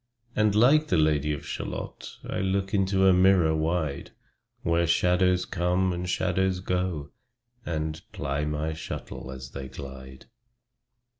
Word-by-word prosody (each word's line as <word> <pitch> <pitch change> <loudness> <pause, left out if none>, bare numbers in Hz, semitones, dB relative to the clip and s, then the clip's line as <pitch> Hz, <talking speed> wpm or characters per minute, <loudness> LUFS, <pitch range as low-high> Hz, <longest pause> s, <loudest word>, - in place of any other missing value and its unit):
And 105 -1 +3
like 140 +8 +5
the 90 - +2
Lady 75 -1 +2
of 75 - -4
Shalott - - -6
I - - -2
look 95 0 -1
into 95 -1 +2
a 95 - +7
mirror 90 -3 +4
wide, 80 -2 -1 0.5
Where 85 +1 +2
shadows 90 +2 +3
come, 90 +1 +1
and 90 0 -4
shadows 95 +1 +1
go, 90 -6 -2 0.6
And 80 -1 -2
ply 70 +2 -2
my 75 +1 -2
shuttle 80 -4 -7
as 65 0 -8
they 70 -1 -6
glide. 65 -1 -10
85 Hz, 135 wpm, -27 LUFS, 75-95 Hz, 0.6 s, a